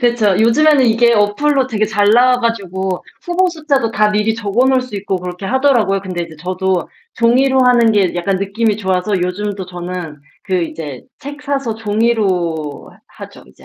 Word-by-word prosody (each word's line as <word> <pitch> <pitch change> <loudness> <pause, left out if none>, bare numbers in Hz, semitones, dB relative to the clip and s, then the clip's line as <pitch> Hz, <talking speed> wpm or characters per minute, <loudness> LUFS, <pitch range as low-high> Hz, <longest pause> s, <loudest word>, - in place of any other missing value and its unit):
그쵸. 235 -6 +2
요즘에는 270 +4 +4
이게 235 +1 +3
어플로 260 +7 +1
되게 215 -3 0
잘 205 -1 +2
나와 250 +2 +4
가지고 190 -5 -2 0.2
후보 360 +1 +1
숫자도 290 -8 -1
다 210 0 +2
미리 210 +1 0
적어 225 +4 0
놓을 260 -1 +3
수 255 -4 -10
있고 195 -1 -2
그렇게 180 +1 -6
하더라고요. 250 -7 +2
근데 185 -3 -4
인제 165 -2 -10
저도 185 +2 -2 0.3
종이로 260 +3 +3
하는 240 -2 +4
게 195 -4 +1
약간 175 +2 -1
느낌이 205 +2 -1
좋아서 190 0 -1
요즘도 195 +1 -3
저는 175 -4 -7 0.2
그 185 -3 -1
이제 150 -5 -6 0.2
책 290 +1 -9
사서 275 -6 -2
종이로 200 -9 -1 0.2
하 - - -11
하죠, - - -15
이제 65 - -20
210 Hz, 355 characters per minute, -16 LUFS, 185-245 Hz, 0.3 s, 요즘에는